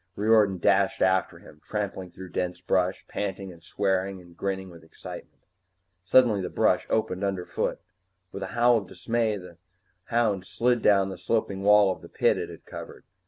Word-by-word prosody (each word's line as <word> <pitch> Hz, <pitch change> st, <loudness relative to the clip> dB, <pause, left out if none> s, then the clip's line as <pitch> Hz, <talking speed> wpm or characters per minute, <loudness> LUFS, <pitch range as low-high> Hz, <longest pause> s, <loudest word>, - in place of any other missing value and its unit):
Riordan 105 Hz, -2 st, +3 dB
dashed 95 Hz, +2 st, +2 dB
after 95 Hz, -1 st, +1 dB
him, 75 Hz, -, -16 dB
trampling 100 Hz, -3 st, -4 dB
through 95 Hz, +1 st, -10 dB
dense 90 Hz, 0 st, -3 dB
bush, 90 Hz, +1 st, 0 dB
panting 95 Hz, -1 st, -4 dB
and 85 Hz, -, -17 dB
swearing 95 Hz, +1 st, -1 dB
and 85 Hz, -1 st, -16 dB
grinning 95 Hz, 0 st, -3 dB
with 85 Hz, -1 st, -14 dB
excitement. 80 Hz, -, -11 dB, 0.6 s
Suddenly 110 Hz, -1 st, +4 dB
the 90 Hz, -, -3 dB
brush -, -, +1 dB
opened 105 Hz, -4 st, 0 dB
underfoot. 95 Hz, -3 st, -2 dB, 0.5 s
With 100 Hz, -, -7 dB
a 95 Hz, -, -3 dB
howl 120 Hz, 0 st, +5 dB
of 100 Hz, -, -10 dB
dismay, 110 Hz, +3 st, -1 dB
the 90 Hz, -3 st, -12 dB, 0.5 s
hound 110 Hz, -5 st, +1 dB
slid 120 Hz, 0 st, +1 dB
down 100 Hz, -2 st, +4 dB
the 95 Hz, -2 st, -7 dB
sloping 100 Hz, +1 st, -1 dB
wall 105 Hz, -1 st, +5 dB
of -, -, -19 dB
the -, -, -12 dB
pit -, -, +2 dB
it -, -, -4 dB
had -, -, -12 dB
covered. -, -, -9 dB
95 Hz, 170 wpm, -26 LUFS, 90-105 Hz, 0.6 s, howl